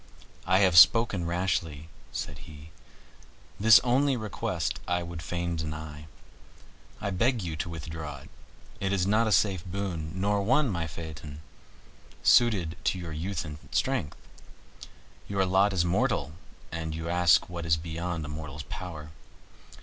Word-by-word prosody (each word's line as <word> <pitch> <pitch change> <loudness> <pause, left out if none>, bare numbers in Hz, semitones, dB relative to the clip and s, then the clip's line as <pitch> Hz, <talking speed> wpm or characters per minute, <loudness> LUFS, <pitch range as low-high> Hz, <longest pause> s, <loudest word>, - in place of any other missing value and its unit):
"I 95 +1 +4
have 90 -3 +7
spoken 105 -7 +5
rashly," 85 -4 -1 0.2
said 75 0 -5
he; 75 +1 -12 0.9
"this 110 +2 +8
only 130 +2 +2
request 110 -3 -3
I 90 0 0
would 85 -1 -7
fain 85 +1 -3
deny. 75 -1 -6 0.9
I 100 - -3
beg 115 +4 +1
you 85 -3 -4
to 80 - -3
withdraw 80 -2 -6
it. - - -15 0.5
It 95 -1 -1
is 95 -2 +1
not 110 +3 +3
a - - 0
safe 95 -4 +2
boon, 90 -4 -4
nor 100 +2 +1
one, 130 +5 +2
my 85 -3 -2
Phaeton, 80 -2 -8 0.8
suited 95 -9 +4
to - - +1
your 85 -3 -6
youth 90 +4 -3
and 75 -1 -8
strength. 75 - -1 1.1
Your 100 -1 +1
lot 95 +2 +3
is 90 -3 +1
mortal, 95 - 0 0.4
and 80 -1 -4
you 80 0 -5
ask 85 -1 +4
what 85 -1 -6
is 80 -1 +3
beyond 85 0 -4
a - - -7
mortal's 75 -1 -6
power. 80 -4 -7
85 Hz, 145 wpm, -28 LUFS, 80-100 Hz, 1.1 s, this